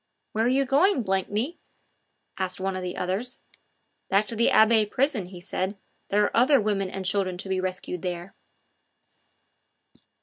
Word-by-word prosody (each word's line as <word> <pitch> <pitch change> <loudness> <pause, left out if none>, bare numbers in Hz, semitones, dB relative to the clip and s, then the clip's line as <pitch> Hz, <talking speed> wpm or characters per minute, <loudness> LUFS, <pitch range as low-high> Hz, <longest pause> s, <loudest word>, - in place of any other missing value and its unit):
"Where 220 +1 0
are 250 +2 +3
you 275 - +2
going, 280 - +3
Blakeney?" 205 - -1 0.8
asked 185 0 -2
one 190 0 -2
of 185 - -3
the 180 0 -5
others. 195 +8 -2 0.7
"Back 200 +2 +3
to 230 - -2
the 230 +1 +3
Abbaye 220 -1 +5
prison," 255 -8 0
he 180 -1 -10
said; 190 +2 -3 0.3
"there 205 +1 +2
are - - -1
other 260 +4 +5
women 200 -3 0
and 190 0 -5
children 185 -1 0
to 195 - -6
be 190 -1 0
rescued 185 -1 -4
there!" 180 +1 -5
200 Hz, 160 wpm, -26 LUFS, 185-230 Hz, 0.8 s, Abbaye